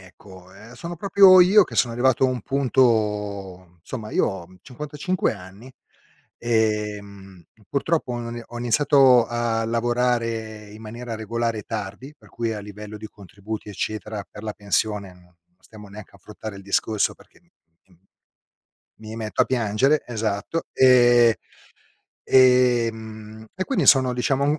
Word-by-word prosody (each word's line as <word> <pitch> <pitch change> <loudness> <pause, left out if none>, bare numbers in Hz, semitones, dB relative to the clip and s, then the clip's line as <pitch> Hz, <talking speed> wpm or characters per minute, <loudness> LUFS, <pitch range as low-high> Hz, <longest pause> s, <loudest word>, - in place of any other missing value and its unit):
ecco. 95 0 -16
Ehm, 110 +5 -14
sono 170 +7 -7
proprio 190 0 +6
io 195 +4 +6
che - - -7
sono 120 - +2
arrivato 130 +2 +2
a - - +5
un 125 -2 -3
punto 105 -9 -1
insomma 110 -4 -7
io - - +1
ho 95 -4 -5
55 150 - -3
anni, 100 +6 -13 0.7
ehm, 105 -5 -2 0.2
purtroppo 145 -2 -1
ho 120 -1 -5
i 120 0 -7
ho 120 - -9
iniziato 125 0 +4
a 120 -1 -1
lavorare 115 -2 -2
in 105 +2 -12
maniera 115 +2 -7
regolare 115 0 -3
tardi, 105 +6 -7
per - - -20
cui 115 -1 -3
a 110 - -5
livello 105 +1 -10
di 110 +1 -8
contributi, 105 +2 -9
eccetera, 105 +1 -5
per 105 - -12
la 110 -1 -4
pensione, 100 -1 -1
non 90 0 -20
non 90 0 -31 0.2
stiamo 105 - -11
neanche 100 +1 -12
ad - - -18
affrontare 105 +1 -9
il 100 - -11
discorso 100 +2 0
perché - - -23
m - - -34 1.5
mi 110 0 -8
metto 110 -2 -1
a - - -11
piangere. 130 +5 +1
Esatto. 110 +6 -3
E 120 -3 +5 0.9
e 125 -2 +5
ehm, 110 -1 -11
e 185 - -3
quindi 270 - 0
sono, 130 -2 +5
diciamo, 140 +4 0
110 Hz, 145 wpm, -23 LUFS, 105-125 Hz, 1.5 s, proprio